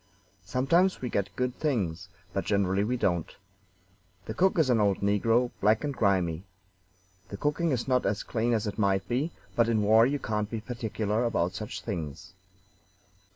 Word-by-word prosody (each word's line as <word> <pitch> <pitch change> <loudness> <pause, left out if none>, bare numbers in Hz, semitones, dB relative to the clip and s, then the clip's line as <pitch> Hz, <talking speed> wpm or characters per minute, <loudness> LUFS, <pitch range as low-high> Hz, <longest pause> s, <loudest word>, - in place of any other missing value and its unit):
Sometimes 165 - +2
we 125 - -4
get 100 -1 0
good 125 0 -1
things, 95 - -1 0.2
but 95 - -1
generally 100 -1 +1
we 125 +4 -1
don't. 85 -8 -1 0.9
The - - -4
cook 190 0 +2
is 150 -6 +3
an 115 - +3
old 100 -2 +2
negro, 115 +5 +2
black 110 +4 +3
and 145 -1 -2
grimy. 95 -7 +1 0.9
The 100 - -6
cooking 150 +6 0
is 130 -4 -1
not 125 -1 +2
as 100 0 -1
clean 120 +1 0
as 110 -1 0
it 105 +1 -4
might 95 -2 +1
be, 135 +7 -1 0.2
but 115 -1 +3
in 110 -2 +2
war 110 +3 +6
you 145 +2 0
can't 105 -5 -2
be 115 - -3
particular 110 -2 -2
about 90 -7 0
such 105 - -6
things. 90 -2 -6
110 Hz, 170 wpm, -28 LUFS, 100-125 Hz, 0.9 s, war